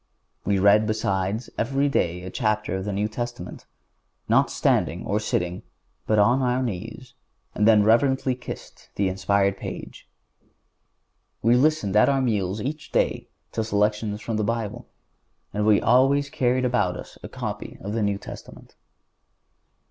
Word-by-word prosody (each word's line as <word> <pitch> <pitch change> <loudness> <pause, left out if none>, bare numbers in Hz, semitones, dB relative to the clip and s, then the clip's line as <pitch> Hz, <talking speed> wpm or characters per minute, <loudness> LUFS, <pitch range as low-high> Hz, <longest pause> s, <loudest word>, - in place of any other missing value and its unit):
We 100 -1 +2
read, 100 +3 +5
besides, 100 +1 -1
every 135 +4 +1
day 90 -10 0
a 95 - -7
chapter 105 -4 -1
of 95 0 -4
the 105 - -2
New 100 +2 0
Testament, 120 -4 -6 0.6
not - - +3
standing - - 0
or 105 - 0
sitting, 90 -4 -2 0.5
but 110 - +2
on 120 +6 +4
our 125 0 +1
knees, 115 +3 -6 0.4
and 105 - +2
then 110 -2 +6
reverently 130 +4 +3
kissed 125 0 -10
the 100 - +1
inspired 100 +1 +1
page. - - -8 1.3
We 115 +2 +5
listened 130 -7 +2
at 105 - +5
our 135 -1 +2
meals 105 -6 0
each 150 +3 -5
day - - 0 0.2
to 110 - -1
selections 105 0 0
from 115 -2 -3
the 110 - 0
Bible, 115 -1 -3 0.7
and 105 +1 0
we 105 -2 +5
always 140 +2 +3
carried 125 0 +1
about 105 -8 +1
with - - -6
us - - -14
a - - -8
copy - - -6
of 100 +2 -5
the 115 - -1
New 100 -1 0
Testament. - - -11
110 Hz, 155 wpm, -24 LUFS, 100-125 Hz, 1.3 s, then